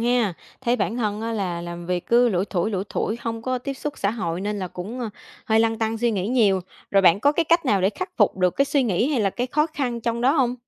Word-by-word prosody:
hen? 235 -4 +2 0.3
Thấy 245 -1 +1
bản 235 - -1
thân 210 -3 -1
á 230 +1 -3
là 180 -5 -2
làm 175 0 -7
việc 180 0 -2
cứ 240 +1 +4
lủi 185 -2 +1
thủi, 190 +1 -1
lủi 195 -2 -2
thủi 220 - -2
hông 225 -1 -4
có 255 +1 -1
tiếp 275 +2 -5
xúc 290 +2 -5
xã 200 - +1
hội 175 -6 -3
nên 205 +1 -2
là 185 -2 -3
cũng, 210 +10 -6
a, 230 - -3 0.4
hơi 220 0 +4
lăn 225 0 +1
tăn 225 0 -1
suy 240 +1 +2
nghĩ 200 -2 -1
nhiều. 215 -6 +3 0.3
Rồi, 195 -1 +4
bạn 180 +1 +5
có 285 +5 +4
cái 335 +1 +1
cách 335 0 +3
nào 205 -6 +3
để 190 +2 +3
khắc 370 +9 -5
phục 210 -3 +3
được 180 -1 +1
cái 275 - +4
suy 280 -1 +1
nghĩ 230 +3 +1
hay 275 -6 +1
là 200 -2 +2
cái 245 +5 -2
khó 300 +4 +1
khăn 255 -7 -3
trong 235 0 -1
đó 260 +3 +4
hông? 255 -5 +2
225 Hz, 280 wpm, -23 LUFS, 195-250 Hz, 0.4 s, bạn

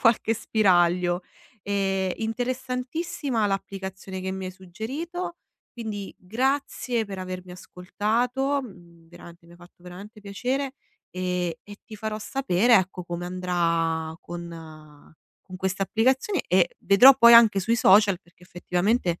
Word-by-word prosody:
qualche 230 -1 +3
spiraglio. 180 -4 +2 0.4
E, 195 -2 -1
interessantissima 250 +2 -2
l'applicazione 190 -1 -5
che 190 - -3
mi 190 -1 -5
hai - - -5
suggerito. 265 - -6 0.4
Quindi 215 -4 -6
grazie 245 +1 -1
per 195 -1 -7
avermi 185 0 -7
ascoltato, 235 +10 -2
mhmm, 170 -6 -15
veramente 170 0 -14
mi 170 - -17
ha - - -17
fatto 175 0 -19
veramente 195 +5 -11
piacere 255 +7 -3 0.4
e 180 -2 -2
e 205 0 -11
ti 215 - -11
farò 215 0 -4
sapere, 235 -2 +2
ecco, 185 -2 +1
come 175 0 -5
andrà 170 -3 -1
con 160 -4 -11 0.3
con 185 -1 -10
questa 190 +1 -2
applicazione, 260 - +1
e - - +2
vedrò 250 +8 +8
poi 235 -2 +8
anche 225 -4 +7
sui 225 +5 +1
social, 195 -3 +5
perché 175 0 -26
effettivamente 180 +1 -1
195 Hz, 130 wpm, -25 LUFS, 180-235 Hz, 0.4 s, vedrò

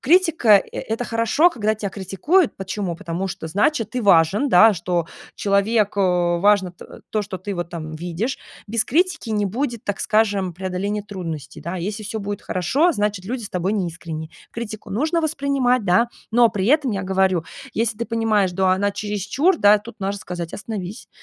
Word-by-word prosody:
критика- 330 -6 +3 0.2
э - - -5
это 225 +2 -3
хорошо, 230 +9 +3
когда 215 -6 0
тебя 205 -2 -4
критикуют. 210 - +1
Почему? 190 -1 -3
Потому 170 +3 -4
что 175 -3 -6
значит 215 - +1
ты 250 - -2
важен, 195 - +4
да, 220 +1 +7
что 175 -1 -1 0.3
человек, 205 +1 +2
а, 180 -3 +2
важно 200 -1 +3
т 175 - -13 0.3
то, 215 - 0
что 200 -2 -6
ты 200 +3 -5
вот 175 0 -4
там 160 -2 -6
видишь. 175 +10 -3 0.3
Без 225 +1 +1
критики 335 -4 0
не 210 -1 +1
будет, 235 +2 -3
так 205 - -2
скажем, 205 -4 +1
преодоления 190 +3 -3
трудностей, 165 -8 -7
да. 170 +2 -5
Если 205 +5 -4
всё 220 +1 -4
будет 200 0 -4
хорошо, 275 - +1
значит 205 - -1
люди 240 +4 -4
с 200 - -7
тобой 185 +2 -1
не 195 -5 0
искренни. 160 -2 -7 0.2
Критику 220 -2 -7
нужно 310 - 0
воспринимать, 275 -6 +1
да, 190 +6 +3 0.2
но 235 0 +6
при 195 -3 -2
этом, 275 -1 +3
я 195 -1 -2
говорю, 190 -3 +1 0.3
если 225 -1 0
ты 235 - -1
понимаешь, 220 -5 +1
до 190 +1 +1
она 195 +2 +2
чересчур, 210 - 0
да, 205 +1 +6
тут 220 +2 -12
можно 200 +1 -2
сказать: 175 -2 -6
"Остановись, 210 -2 -6
205 Hz, 180 wpm, -21 LUFS, 185-230 Hz, 0.3 s, да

